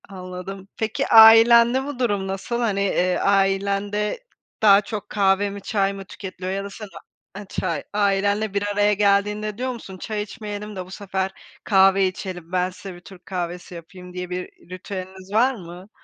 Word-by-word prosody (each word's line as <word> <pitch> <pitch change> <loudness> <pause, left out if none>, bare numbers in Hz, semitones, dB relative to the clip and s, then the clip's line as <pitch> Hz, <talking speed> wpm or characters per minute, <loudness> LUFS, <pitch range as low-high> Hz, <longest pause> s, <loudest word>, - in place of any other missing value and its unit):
Anladım. 185 0 -8
Peki 220 0 -2
ailende 230 +3 +7
bu 285 -3 -6
durum 205 -6 0
nasıl? 195 +5 -3
Hani, 215 -5 0
eee, 185 -2 +1
ailende 200 - 0 0.4
daha 200 -2 +7
çok 210 0 -6
kahve 200 0 +2
mi 200 0 -8
çay 195 0 0
mı 195 0 -8
tüketiliyor? 185 -1 -7
Ya 195 0 -3
da 200 - -6
sen 210 +1 -9 0.5
ha 205 +1 -8
çay - - -3
ailenle 200 +1 +1
bir 200 0 0
araya 205 +1 +3
geldiğinde 210 +1 +1
diyor 255 +1 -2
musun 195 -6 -9
çay 215 +2 -4
içmeyelim 210 -1 -7
de 185 -1 -5
bu 185 - -15
sefer 190 -1 -3 0.3
kahve 195 -1 +4
içelim, 180 -2 -7
ben 180 0 +1
size 185 0 -10
bir - - -12
Türk 180 0 -15
kahvesi 175 -1 -5
yapayım 180 +2 -11
diye 180 0 -5
bir 180 -1 -7
ritüeliniz 185 0 -8
var 250 +5 +4
mı? 180 0 -11
195 Hz, 170 wpm, -22 LUFS, 185-210 Hz, 0.5 s, ailende